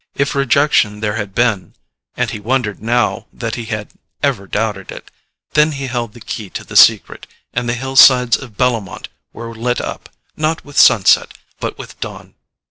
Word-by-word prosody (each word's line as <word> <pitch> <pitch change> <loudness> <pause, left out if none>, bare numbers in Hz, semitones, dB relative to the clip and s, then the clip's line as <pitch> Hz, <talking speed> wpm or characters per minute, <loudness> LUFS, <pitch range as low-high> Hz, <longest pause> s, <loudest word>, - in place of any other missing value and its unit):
If 140 +1 0
rejection 140 -5 +2
there 105 -1 -1
had 105 -3 -5
been—and 110 -7 -3
he 110 - -5
wondered 110 -2 -2
now 120 +2 0
that 115 -2 -5
he 115 - -5
had 110 -2 -5 0.3
ever 125 -9 0
doubted 105 -1 -3
it!—then 150 +1 -3
he 135 -1 -5
held 120 -4 -4
the 120 - -13
key 110 -2 -6
to - - -10
the - - -11
secret, - - +4 0.3
and 120 0 -2
the 120 - 0
hillsides 130 -1 +5
of 115 -6 -9
Bellomont 115 -8 -1 0.2
were 115 0 -8
lit 120 +2 -2
up, - - -6 0.3
not 155 +1 -2
with 145 -1 -2
sunset, 100 - +5 0.2
but - - -4
with - - -11
dawn. - - -8
120 Hz, 165 wpm, -17 LUFS, 105-130 Hz, 0.3 s, hillsides